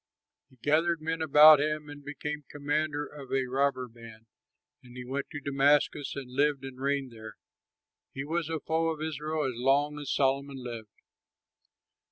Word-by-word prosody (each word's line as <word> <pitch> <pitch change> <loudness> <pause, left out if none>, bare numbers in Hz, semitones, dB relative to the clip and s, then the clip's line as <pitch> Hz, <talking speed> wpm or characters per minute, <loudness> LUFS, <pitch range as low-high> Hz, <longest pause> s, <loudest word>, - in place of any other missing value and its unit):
He 130 - -22
gathered 165 +3 +2
men 160 +1 -3
about 155 0 +8
him 150 0 -2
and 145 0 -10
became 150 +1 -5
commander 145 0 -1
of 140 -4 -11
a 135 -1 +1
robber 130 0 0
band, 115 -1 -14 0.6
and 125 0 -14
he 125 - -7
went 140 +2 -4
to 150 -3 -6
Damascus 140 +1 +1
and 135 -3 -7
lived 140 0 +1
and 130 -1 -9
reigned 140 -2 -1
there. 110 -1 -10 0.8
He 135 - -5
was 165 +1 -2
a 160 -1 -2
foe 160 +1 0
to 155 - -4
Israel 155 0 -3
as 130 - -1
long 145 +3 +2
as 145 -2 -6
Solomon 135 0 0
lived. 120 -4 -7
145 Hz, 165 wpm, -29 LUFS, 130-150 Hz, 0.8 s, about